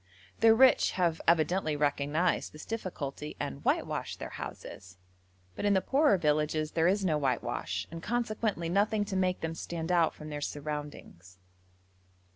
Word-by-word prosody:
The 225 0 +6
rich 260 +2 +5
have 170 -3 0
evidently 165 -1 +2
recognised 145 +4 0
this 155 - -10
difficulty 150 -9 -5
and 70 - -5
whitewash - - -1
their - - -7
houses, 90 -1 -9 0.6
but - - -5
in 205 -1 +3
the - - +5
poorer 275 +1 +3
villages 155 -1 0
there 165 +1 +2
is 195 +1 +2
no 155 -4 +2
whitewash, 105 - -2
and 165 0 -7
consequently 215 -5 -1
nothing 205 +4 +1
to 200 -1 -4
make 185 -1 0
them 160 0 -2
stand 165 +1 -4
out 170 -2 +3
from 155 0 -9
their 145 -1 -5
surroundings. 145 - -6
165 Hz, 150 wpm, -30 LUFS, 150-195 Hz, 0.6 s, The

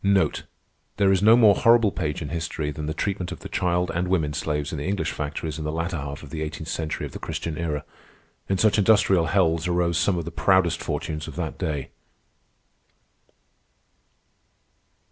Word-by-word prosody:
There 100 -1 +4
is 95 -1 +2
no 110 +3 +7
more 110 -4 +7
horrible 115 -1 +4
page 80 -2 -3
in 75 - -6
history 80 -2 -3
than 75 +1 -5
the 80 - -2
treatment 95 0 -2
of - - -7
the - - -7
child 90 0 0
and 90 +2 -1
women 80 -5 +1
slaves 75 0 -2
in 80 - -4
the 75 - -4
English 100 0 -1
factories 75 +1 -4
in - - -4
the 75 - -2
latter 85 +3 -2
half 70 +1 -6
of 70 - -11
the 80 -1 -4
eighteenth 80 +1 -5
century 80 -2 -3
of - - -8
the - - -8
Christian 80 -2 -4
Era. 75 -3 -3 0.6
In 95 - +2
such 110 +1 +3
industrial 100 -5 +4
hells 85 -2 +2
arose 85 -1 +1
some 90 +1 +2
of 85 - -3
the 85 - -5
proudest 85 +1 +2
fortunes 75 0 -4
of - - -8
that - - -4
day. 75 -4 -3
85 Hz, 185 wpm, -24 LUFS, 75-95 Hz, 0.6 s, no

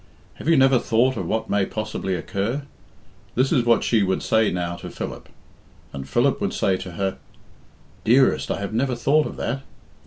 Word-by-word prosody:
"Have - - -2
you 165 - +5
never 135 -1 +5
thought 120 +4 +2
of 95 -6 -3
what 110 +3 -1
may 100 -1 +1
possibly 105 -2 -3
occur?" 100 - -2 0.7
This 130 +2 +2
is 125 -7 +3
what 115 -1 +4
she 115 -3 +2
would 95 -1 0
say 110 -1 +3
now 85 -1 -2
to - - -8
Philip. - - -7 0.6
And 70 -1 -7
Philip - - +2
would - - -1
say 95 - +2
to 90 -1 -8
her, 95 +2 -2 0.8
"Dearest, 130 +4 +3
I - - -1
have 100 +1 -4
never 125 +2 0
thought 145 +6 +2
of - - -8
that. 130 +3 -3
110 Hz, 185 wpm, -23 LUFS, 95-130 Hz, 0.8 s, you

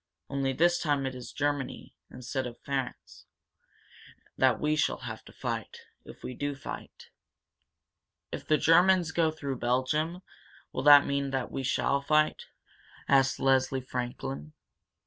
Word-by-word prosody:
Only 135 -1 0
this 175 +6 +3
time 145 -3 0
it 130 - -3
is 125 -1 -8
Germany, 145 -2 -3 0.2
instead 130 +1 -4
of 120 - -10
France, 135 -2 -5 1.1
that - - +3
we 150 0 +1
shall 150 - 0
have - - -7
to - - -13
fight - - -5 0.2
if - - -13
we 125 - -5
do 145 +2 -3
fight." 135 - -9 1.2
"If - - -6
the 155 - +4
Germans 175 +2 +4
go 160 0 +2
through 140 -5 -5
Belgium, 150 +8 0 0.5
will - - -2
that 145 +1 +8
mean 140 0 -1
that 135 -2 -3
we 135 - -3
shall 140 +1 +1
fight?" 155 +2 +1 0.6
asked 135 -1 +3
Leslie 135 0 +2
Franklin. 120 - -5
140 Hz, 140 wpm, -29 LUFS, 130-155 Hz, 1.2 s, that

